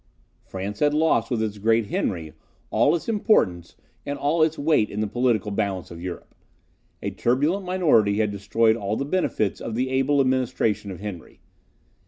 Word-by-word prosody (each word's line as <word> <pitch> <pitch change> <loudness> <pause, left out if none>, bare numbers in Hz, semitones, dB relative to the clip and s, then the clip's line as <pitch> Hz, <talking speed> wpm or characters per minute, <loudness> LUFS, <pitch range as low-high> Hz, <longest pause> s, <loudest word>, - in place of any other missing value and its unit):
France 100 +2 -6
had 150 0 +2
lost 155 -7 +2
with 115 -3 0
its 105 -1 -4
great 115 +2 +2
Henry 80 -5 -2 0.4
all - - +3
its 170 - -5
importance 110 - +1 0.3
and 145 0 -4
all 150 +4 +1
its 155 0 +2
weight 145 -7 +2
in 105 - -5
the 110 - +1
political 110 -2 0
balance 100 -3 -2
of 85 0 -9
Europe. 90 -1 -7 0.7
A - - -2
turbulent 150 +11 0
minority 130 - +3
had 105 -1 +1
destroyed 110 +3 +2
all 105 -1 -2
the 140 - -2
benefits 145 - -1
of 115 - -4
the 130 +2 -1
able 135 +2 +2
administration 125 -6 0
of 95 -1 -8
Henry. 100 -6 -8
115 Hz, 170 wpm, -24 LUFS, 100-145 Hz, 0.7 s, all